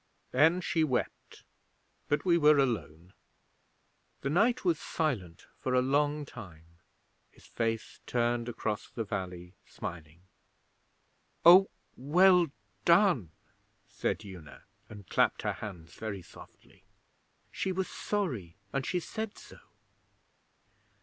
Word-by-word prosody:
Then 160 Hz, +7 st, +4 dB
she 165 Hz, -2 st, +1 dB
wept, 130 Hz, -5 st, -3 dB, 0.6 s
but 145 Hz, -, 0 dB
we 175 Hz, -2 st, +4 dB
were 150 Hz, -2 st, +5 dB
alone.' 100 Hz, -, -1 dB, 1.1 s
The 140 Hz, -, -2 dB
knight 230 Hz, +7 st, +2 dB
was 165 Hz, -3 st, +2 dB
silent 100 Hz, -, -3 dB
for 130 Hz, -1 st, -1 dB
a 125 Hz, -, +5 dB
long 145 Hz, +2 st, +1 dB
time, 85 Hz, -, -13 dB, 0.5 s
his -, -, -21 dB
face 115 Hz, -1 st, -3 dB
turned 120 Hz, 0 st, 0 dB
across 110 Hz, -3 st, -3 dB
the 115 Hz, -, -4 dB
valley, 90 Hz, -3 st, -5 dB
smiling. 85 Hz, 0 st, -8 dB, 1.2 s
'Oh, 185 Hz, +3 st, +9 dB, 0.3 s
well 180 Hz, +5 st, +5 dB, 0.4 s
done!' 170 Hz, -, +4 dB, 0.6 s
said -, -, -3 dB
Una, 85 Hz, -7 st, -11 dB, 0.3 s
and 105 Hz, -4 st, -11 dB
clapped -, -, +1 dB
her -, -, 0 dB
hands 85 Hz, -5 st, -9 dB
very 100 Hz, -4 st, -6 dB
softly. -, -, -17 dB, 0.7 s
'She 190 Hz, -, -2 dB
was 185 Hz, 0 st, -1 dB
sorry, 130 Hz, -, -3 dB, 0.2 s
and 135 Hz, -, 0 dB
she 180 Hz, -, 0 dB
said 220 Hz, +4 st, -5 dB
so.' -, -, -14 dB
125 Hz, 115 wpm, -30 LUFS, -, 1.2 s, Oh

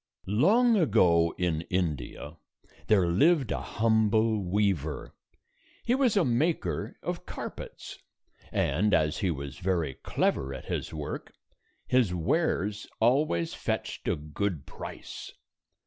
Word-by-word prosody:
Long 210 Hz, -, +4 dB
ago, 90 Hz, -, +4 dB
in 85 Hz, -3 st, 0 dB
India, 80 Hz, -3 st, -2 dB, 0.5 s
there 100 Hz, -4 st, +4 dB
lived 135 Hz, -, +3 dB
a -, -, -1 dB
humble 110 Hz, -1 st, +2 dB
weaver. 90 Hz, -6 st, -1 dB, 0.7 s
He 240 Hz, -, +1 dB
was 255 Hz, -5 st, +3 dB
a 185 Hz, -, +4 dB
maker 145 Hz, +8 st, 0 dB
of -, -, -4 dB
carpets, -, -, -7 dB, 0.5 s
and 100 Hz, +2 st, +2 dB
as 75 Hz, -2 st, +1 dB
he 100 Hz, -4 st, +1 dB
was 70 Hz, -4 st, -5 dB
very 85 Hz, -6 st, 0 dB
clever 65 Hz, +1 st, -1 dB
at 65 Hz, -, -9 dB
his -, -, -3 dB
work, 75 Hz, -2 st, -6 dB, 0.5 s
his 120 Hz, -8 st, +2 dB
wares 105 Hz, -, 0 dB
always 115 Hz, -, +2 dB
fetched -, -, -3 dB
a -, -, +2 dB
good 75 Hz, +1 st, -3 dB
price. -, -, -8 dB
100 Hz, 115 wpm, -28 LUFS, 85-120 Hz, 0.7 s, Long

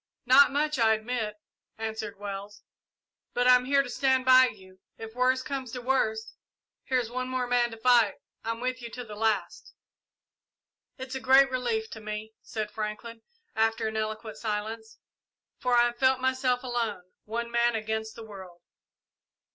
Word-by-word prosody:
"Not 270 Hz, +3 st, +7 dB
much, 300 Hz, 0 st, 0 dB
I 220 Hz, -1 st, +5 dB
admit," 220 Hz, -1 st, -3 dB, 0.4 s
answered 220 Hz, -2 st, -5 dB
Wells; 200 Hz, +1 st, -7 dB, 0.7 s
"but 245 Hz, 0 st, +2 dB
I'm 250 Hz, 0 st, +6 dB
here 275 Hz, +1 st, +3 dB
to 250 Hz, -, -8 dB
stand 260 Hz, 0 st, +2 dB
by 255 Hz, 0 st, +7 dB
you. 190 Hz, -4 st, -12 dB, 0.2 s
If 225 Hz, 0 st, -8 dB
worst 255 Hz, +1 st, +1 dB
comes 265 Hz, -4 st, -4 dB
to 250 Hz, -, -5 dB
worst, 220 Hz, -4 st, 0 dB, 0.5 s
here's 250 Hz, -3 st, 0 dB
one 255 Hz, +1 st, -3 dB
more 255 Hz, -1 st, -1 dB
man 245 Hz, -1 st, +2 dB
to 225 Hz, -, -9 dB
fight. 235 Hz, -3 st, +4 dB, 0.3 s
I'm 230 Hz, +1 st, -3 dB
with 255 Hz, 0 st, -2 dB
you 235 Hz, -, -7 dB
to 250 Hz, -, -6 dB
the 215 Hz, -3 st, -9 dB
last." 220 Hz, 0 st, -2 dB, 1.2 s
"It 260 Hz, -1 st, -7 dB
is 255 Hz, -, -5 dB
a -, -, -2 dB
great 265 Hz, +1 st, +5 dB
relief 240 Hz, -4 st, -1 dB
to 220 Hz, -, -7 dB
me," 215 Hz, +1 st, -6 dB
said 215 Hz, -1 st, -5 dB
Franklin, 220 Hz, +2 st, -5 dB, 0.3 s
after 225 Hz, 0 st, +1 dB
an 220 Hz, -, -8 dB
eloquent 215 Hz, 0 st, -4 dB
silence, 220 Hz, +1 st, -4 dB, 0.6 s
"for 250 Hz, -1 st, +1 dB
I 240 Hz, -, +6 dB
have 240 Hz, 0 st, -3 dB
felt 260 Hz, -1 st, +3 dB
myself 260 Hz, -1 st, 0 dB
alone 235 Hz, -6 st, -2 dB, 0.2 s
one 235 Hz, +2 st, -4 dB
man 235 Hz, 0 st, +2 dB
against 220 Hz, 0 st, -3 dB
the 230 Hz, -, -9 dB
world." 190 Hz, -4 st, -11 dB
235 Hz, 165 wpm, -28 LUFS, 220-255 Hz, 1.2 s, Not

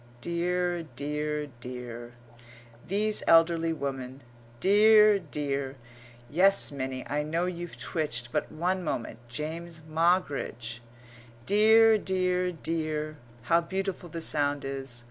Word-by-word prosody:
Dear, 175 Hz, +2 st, -1 dB
dear, 150 Hz, +2 st, -2 dB
dear! 120 Hz, -1 st, -8 dB, 0.7 s
these 210 Hz, +3 st, +1 dB
elderly 165 Hz, 0 st, +4 dB
women. 135 Hz, -3 st, -5 dB, 0.4 s
Dear, 210 Hz, -, +6 dB
dear!" 140 Hz, -4 st, -3 dB, 0.5 s
[Yes, 185 Hz, +8 st, +4 dB
Minnie; 130 Hz, -2 st, -4 dB
I 145 Hz, +1 st, -1 dB
know 165 Hz, +4 st, -1 dB
you've 175 Hz, -1 st, -5 dB
twitched, 120 Hz, -7 st, -1 dB
but 150 Hz, -, -2 dB
one 180 Hz, +4 st, -1 dB
moment 115 Hz, -7 st, -4 dB
James 160 Hz, +6 st, -6 dB
Moggridge]. 155 Hz, -8 st, 0 dB, 0.7 s
"Dear, 220 Hz, +2 st, +6 dB
dear, 185 Hz, -1 st, 0 dB
dear!" 155 Hz, -2 st, -3 dB, 0.3 s
How 170 Hz, +8 st, +3 dB
beautiful 190 Hz, 0 st, -4 dB
the 165 Hz, +1 st, -6 dB
sound 145 Hz, -3 st, +1 dB
is! 135 Hz, -3 st, -4 dB
160 Hz, 105 wpm, -28 LUFS, 140-180 Hz, 0.7 s, Dear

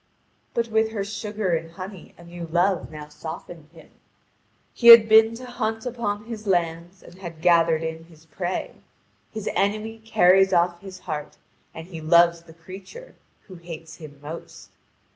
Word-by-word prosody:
But 235 Hz, -1 st, 0 dB
with 220 Hz, 0 st, +1 dB
her 200 Hz, -3 st, -2 dB
sugar 205 Hz, -2 st, -3 dB
and 165 Hz, 0 st, -6 dB
honey 190 Hz, 0 st, -10 dB
a 170 Hz, -, -15 dB
new 170 Hz, 0 st, -8 dB
Love 175 Hz, +2 st, 0 dB
now 150 Hz, -1 st, -9 dB
softened 160 Hz, +1 st, -9 dB
him; 165 Hz, -1 st, -17 dB, 0.8 s
he 235 Hz, -, 0 dB
had 230 Hz, -2 st, +11 dB
been 220 Hz, +1 st, +6 dB
to 255 Hz, +2 st, -9 dB
hunt 225 Hz, -2 st, -4 dB
upon 220 Hz, -4 st, -3 dB
his 220 Hz, -2 st, -8 dB
lands 175 Hz, 0 st, -1 dB
and 180 Hz, -, -15 dB
had 170 Hz, -4 st, -9 dB
gathered 165 Hz, -1 st, +3 dB
in 160 Hz, 0 st, -5 dB
his 165 Hz, -1 st, -20 dB
prey. 180 Hz, +3 st, -4 dB, 0.6 s
His 220 Hz, -2 st, -6 dB
enemy 215 Hz, +3 st, -1 dB
carries 190 Hz, -3 st, +4 dB
off 175 Hz, 0 st, +2 dB
his 190 Hz, -2 st, -10 dB
heart, 150 Hz, -3 st, -6 dB, 0.3 s
and 160 Hz, -, -9 dB
he 170 Hz, -3 st, -9 dB
loves 170 Hz, +1 st, +4 dB
the 165 Hz, -1 st, -16 dB
creature 190 Hz, -, -12 dB, 0.3 s
who 190 Hz, -, -14 dB
hates 165 Hz, -1 st, -10 dB
him 150 Hz, -4 st, -12 dB
most. 160 Hz, +3 st, -10 dB
180 Hz, 160 wpm, -24 LUFS, 165-215 Hz, 0.8 s, had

